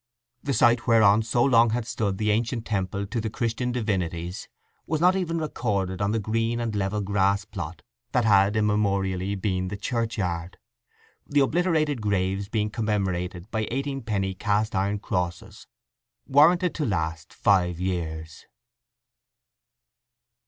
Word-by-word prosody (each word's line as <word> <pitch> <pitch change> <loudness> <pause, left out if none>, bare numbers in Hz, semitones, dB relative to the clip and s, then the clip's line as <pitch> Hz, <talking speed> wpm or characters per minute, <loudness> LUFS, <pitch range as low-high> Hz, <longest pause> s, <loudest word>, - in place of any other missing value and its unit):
The 140 -2 -1
site 120 +2 +3
whereon 110 -2 +5
so 115 +2 +1
long 120 -3 +5
had 115 +1 -1
stood 100 -4 -2
the 105 +1 +1
ancient 115 +2 -1
temple 100 -1 -2
to 110 +3 -3
the 110 - -2
Christian 115 +3 -2
divinities 90 -7 -2 0.4
was 155 0 0
not 180 +3 +4
even 170 -3 -1
recorded 100 - -2
on 100 - +1
the 110 - +1
green 115 +2 -1
and 115 -2 -2
level 100 +1 -1
grass 100 0 +1
plot - - -7 0.3
that 120 -2 +2
had 100 -1 +4
immemorially 100 -3 0
been 95 -1 -1
the 100 +2 -5
churchyard, 100 -6 -2 0.7
the 145 0 +3
obliterated 155 -3 +1
graves 100 -1 -1
being 105 -2 -1
commemorated 95 -4 -2
by 110 -2 -1
eighteen 135 +2 -3
penny 100 -4 -1
cast 105 +3 0
iron 100 +1 0
crosses 90 -3 -4 0.6
warranted 170 +6 +4
to 155 - -2
last 80 -5 -2
five 90 -4 +2
years. 80 -4 -4
105 Hz, 140 wpm, -25 LUFS, 95-115 Hz, 0.7 s, whereon